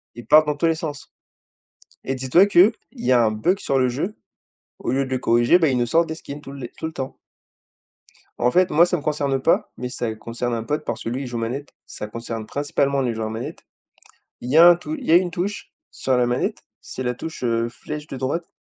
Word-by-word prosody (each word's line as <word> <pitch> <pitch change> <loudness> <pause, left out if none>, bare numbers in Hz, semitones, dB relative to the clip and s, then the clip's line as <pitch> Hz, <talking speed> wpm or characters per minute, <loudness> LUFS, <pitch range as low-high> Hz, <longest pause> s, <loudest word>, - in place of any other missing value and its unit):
Ils 120 - -10
partent 155 0 +6
dans 150 - 0
tous 165 - 0
les 165 0 +3
sens 155 -4 -6 0.9
et 135 - -1
dis-toi 130 +9 +4
qu'il 200 +1 +6 0.2
y 235 - 0
a 120 -2 +5
un 110 - +3
bug 140 - +1
sur 135 - 0
le 130 -1 +3
jeu. 150 - -3 0.6
Au - - -2
lieu 135 +1 +1
de - - -9
le 130 - 0
corriger, 120 +8 +4
bah 160 -4 +3
ils 130 - +1
nous 120 - +2
sortent 165 +7 +2
des 160 - -4
skins 145 -2 -9
tout 135 - -10
les 130 -4 -7
tout - - -5
le 160 - -3
temps. 135 -3 -5 1.2
En 120 - +2
fait 185 +4 +3
moi, 165 +3 +5
ça 180 0 0
me - - -7
concerne 140 -3 -1
pas - - +2
mais 125 - -4
ça 120 -3 -3
concerne 120 +2 -4
un 115 -1 -2
pote 150 +6 -3
parce - - -4
que - - -3
lui, 125 +3 -3
il - - -6
joue 120 -1 -4
manette. 125 +5 -4
Ça 105 - -7
concerne 115 0 -6
principalement 140 +1 0
les 125 -3 0
joueurs 110 -1 -3
manette, 110 +2 -6 0.8
il 120 - -6
y 150 - +4
a 170 +2 +10
un 175 - +8
tout 245 - -5
il 280 -5 -8
y - - +1
a - - +8
une 180 -1 0
touche 190 +4 -4 0.2
sur 130 -1 0
la 125 - +3
manette, 120 +1 -1 0.2
c'est 130 - -6
la 125 0 0
touche, 160 +3 -7
heu, 115 -1 0
flèche 150 +5 -7
de 135 - -6
droite. 140 +6 -2
135 Hz, 245 wpm, -22 LUFS, 120-160 Hz, 1.2 s, a